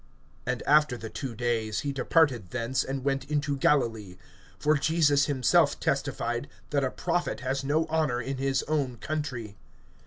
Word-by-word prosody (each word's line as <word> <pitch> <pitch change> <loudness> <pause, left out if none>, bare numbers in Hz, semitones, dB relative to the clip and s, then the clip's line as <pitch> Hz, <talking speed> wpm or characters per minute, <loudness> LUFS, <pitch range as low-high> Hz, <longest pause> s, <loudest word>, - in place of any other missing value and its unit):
(43)And 125 -1 -1
after 150 -3 +4
the 110 -1 -8
two 130 -5 -5
days 115 -2 -1
he 145 - -2
departed 135 - +2
thence, 125 +2 -1
and 135 -1 -4
went 135 0 -1
into 145 -1 0
Galilee. 115 -9 +1 0.4
(44)For 150 -1 +2
Jesus 145 -2 +3
himself 130 -5 +3
testified, - - -1 0.2
that - - +1
a - - +1
prophet - - -2
has 135 +2 -2
no 150 +4 +1
honor 155 -6 0
in 130 +2 -4
his 135 0 0
own 140 -5 -1
country. 125 -7 -4
135 Hz, 155 wpm, -28 LUFS, 120-145 Hz, 0.4 s, after